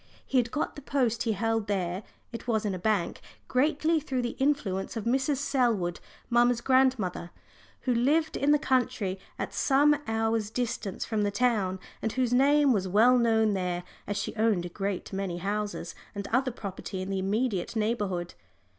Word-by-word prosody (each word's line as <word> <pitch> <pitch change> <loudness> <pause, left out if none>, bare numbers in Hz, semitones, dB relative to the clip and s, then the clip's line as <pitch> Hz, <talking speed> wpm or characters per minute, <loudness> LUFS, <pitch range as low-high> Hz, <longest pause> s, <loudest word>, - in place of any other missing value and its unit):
He 260 - +2
had 240 -1 0
got 295 +5 -2
the 290 - -8
post 250 -5 0
he 225 - +1
held 225 0 0
there 185 -2 -1 0.3
it 230 +1 -8
was 220 -3 +1
in 200 - 0
a 185 - -4
bank 205 -1 0 0.3
greatly 310 +5 +2
through 265 -4 -2
the 240 - -3
influence 230 -8 0
of 220 - -3
Mrs. 265 +5 +1
Selwood, 235 -11 0 0.3
mamma's 240 0 +3
godmother, 255 -10 +2 0.5
who 255 - +1
lived 295 +7 +2
in 280 - +1
the 295 - +6
country 250 -8 0 0.2
at - - -4
some 280 +8 +4
hours' 225 -1 0
distance 230 -4 -3
from 220 -2 -1
the 205 - +2
town, 205 -4 +1 0.2
and 220 - -1
whose 250 -2 +1
name 280 +1 +5
was 190 -3 0
well 230 +7 +5
known 220 -2 +3
there, 180 -2 -2 0.2
as 205 - -2
she - - -3
owned 215 -5 +2
a - - -5
great 195 +1 -4
many 190 -3 -2
houses 200 -2 -3 0.2
and 200 0 -4
other 255 +2 +2
property 195 -4 -6
in 190 - -5
the 195 - -1
immediate 205 +1 -1
neighbourhood. 205 -6 -1
225 Hz, 175 wpm, -28 LUFS, 195-255 Hz, 0.5 s, the